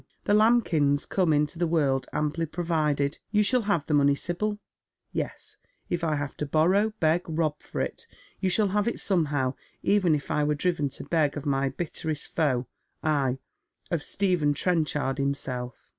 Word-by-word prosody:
The 205 - +1
lambkins 180 -11 +3
come 185 -4 +1
into 150 +3 +1
the 175 - +2
world 140 -5 +1
amply 150 +2 -1
provided. 150 -4 0
You 210 0 +3
shall 250 +4 +3
have 200 -8 0
the 155 - -1
money, 140 -1 +4
Sibyl. 205 +7 -2 0.5
Yes, - - -5 0.3
if 175 -1 -1
I 155 -2 +1
have 145 -1 -4
to 150 - -3
borrow, 185 +9 +3
beg, 160 +2 +3
rob 155 -2 -1
for - - -5
it. - - -4 0.3
You 190 - +1
shall 205 +2 +3
have 205 +2 +1
it 235 - -1
somehow, 145 -9 +1 0.3
even 190 -6 +3
if 145 - -5
I 150 - +2
were 150 0 +1
driven 150 -2 0
to 135 +1 -6
beg 150 0 +1
of 145 - -6
my 135 -1 +1
bitterest 155 +1 -3
foe, 130 -6 +1 0.4
ay, 140 -4 +1 0.5
of 170 -3 0
Stephen 175 -6 +1
Trenchard 150 -5 0
himself." 130 -3 -3
155 Hz, 170 wpm, -27 LUFS, 145-180 Hz, 0.5 s, money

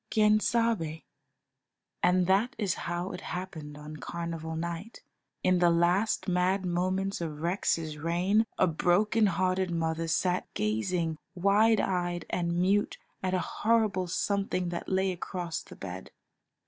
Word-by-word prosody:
Quien 215 0 +4
sabe? 215 -10 0 1.0
And 180 0 +4
that 205 +8 +2
is 200 -5 0 0.2
how 175 +2 -2
it 180 - -7
happened 160 -5 -6
on 150 +1 -8
Carnival 165 0 -5
night, 170 +6 -5 0.4
in 185 -1 +3
the 175 -1 +5
last 175 +7 +2
mad 185 +1 +1
moments 185 +2 -1
of 155 -3 -4
Rex's 165 -3 0
reign, 180 +7 +2
a - - +5
broken 200 +6 +3
hearted 185 +1 +1
mother 165 -1 -1
sat 180 +3 0
gazing 160 - -1 0.2
wide 205 +4 +4
eyed 175 -2 -1
and 170 -1 0
mute 195 +3 +2 0.2
at 185 0 0
a - - +2 0.2
horrible 215 -5 +2
something 185 0 -1
that 170 0 -5
lay 190 0 +2
across 175 -1 -4
the - - -13
bed. 95 -1 -7
180 Hz, 135 wpm, -29 LUFS, 170-195 Hz, 1.0 s, the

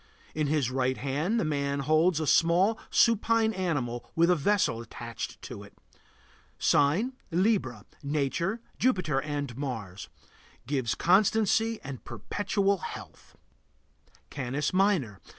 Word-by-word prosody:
In 155 -1 -1
his 140 -4 0
right 130 0 0
hand 150 - -1
the 185 - 0
man 140 -2 -1
holds 155 +4 +3
a 155 - -1
small, 170 +8 +3
supine 230 0 +3
animal 145 - -2
with 170 +2 +4
a - - +4
vessel 175 - +1
attached 115 -1 -7
to - - -8
it. - - -15 0.8
Sign: 175 - +2 0.2
Libra. 170 - 0 0.2
Nature: 155 - -1 0.2
Jupiter 180 - +1
and 145 -4 -4
Mars. 115 -9 -5 0.6
Gives 130 -3 -1
constancy 220 +4 +2
and 135 -2 -7
perpetual 200 - -1
health. - - -9 1.0
CANIS 140 +3 -2
MINOR. 185 - +1
150 Hz, 115 wpm, -28 LUFS, 135-195 Hz, 1.0 s, with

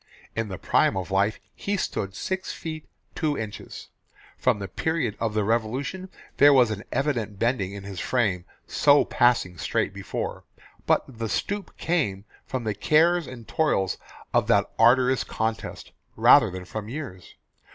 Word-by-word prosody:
In 115 -1 -1
the 95 -2 -6
prime - - +2
of 95 0 -4
life 100 +3 +1
he 205 0 -2
stood 95 - -3
six 190 - -3
feet, 155 -2 -7 0.2
two 150 -3 -1
inches. 110 -2 -7 0.5
From 125 -4 +2
the 100 -1 -5
period 125 - -1
of 110 -2 -1
the 105 - +2
Revolution 125 - -1 0.3
there 145 +1 +8
was 125 -4 +5
an 105 0 -4
evident 120 -7 -1
bending 110 -4 0
in 100 -1 -7
his 100 -2 -7
frame 100 -8 0 0.2
so 145 0 +4
passing 105 -8 +2
straight - - -1
before, - - -5 0.4
but - - +4 0.2
the 115 -1 -2
stoop 200 - -3
came 105 - -1 0.2
from 130 -2 -3
the 110 -2 -1
cares 160 - +3
and 120 -3 -10
toils 100 - +1 0.3
of - - +3
that - - +3
arduous 125 +3 +5
contest 110 0 -4 0.2
rather - - +6
than 90 0 -7
from 105 +4 -6
years. 125 - -7
115 Hz, 155 wpm, -25 LUFS, 100-145 Hz, 0.5 s, there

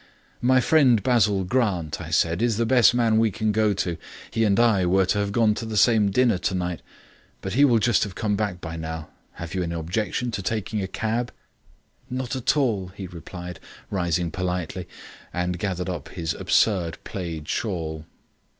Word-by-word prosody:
"My 130 +1 +4
friend 125 -8 +4
Basil 105 -6 +3
Grant," 90 - 0
I - - -7
said, 85 +3 +1
"is 115 -3 +1
the 115 - +1
best 120 0 +5
man 115 -2 +3
we 115 0 +3
can 110 +1 -1
go 110 0 +2
to. 90 -4 -2 0.3
He 115 - +1
and 100 0 +3
I 115 -6 +4
were 95 +2 +3
to 100 +3 +1
have 100 0 -1
gone 110 0 +3
to 115 - -5
the 110 -1 -3
same 110 -1 +4
dinner 115 -2 +2
tonight; 90 -2 -2 0.6
but 95 - -4
he 140 - +4
will 120 -4 +4
just 115 +2 +3
have 100 -3 -5
come 105 -3 0
back 100 -3 -2
by 85 0 -6
now. 80 -1 -6 0.2
Have 85 -1 -7
you 95 - -1
any 85 -1 -2
objection 100 +8 -2
to 100 -3 -3
taking 105 +1 -2
a 95 - -2
cab?" 110 +5 -2 0.8
"Not 130 +1 -3
at 130 +3 +1
all," 110 -10 +1
he 100 - -6
replied, 90 0 -8 0.3
rising 85 -3 0
politely, 90 -1 -3 0.4
and 90 0 -2
gathering 95 -2 -2
up 80 -6 -7
his 80 -1 -3
absurd 90 -7 +1
plaid 85 -5 -5
shawl. 80 -7 -3
100 Hz, 185 wpm, -24 LUFS, 90-115 Hz, 0.8 s, best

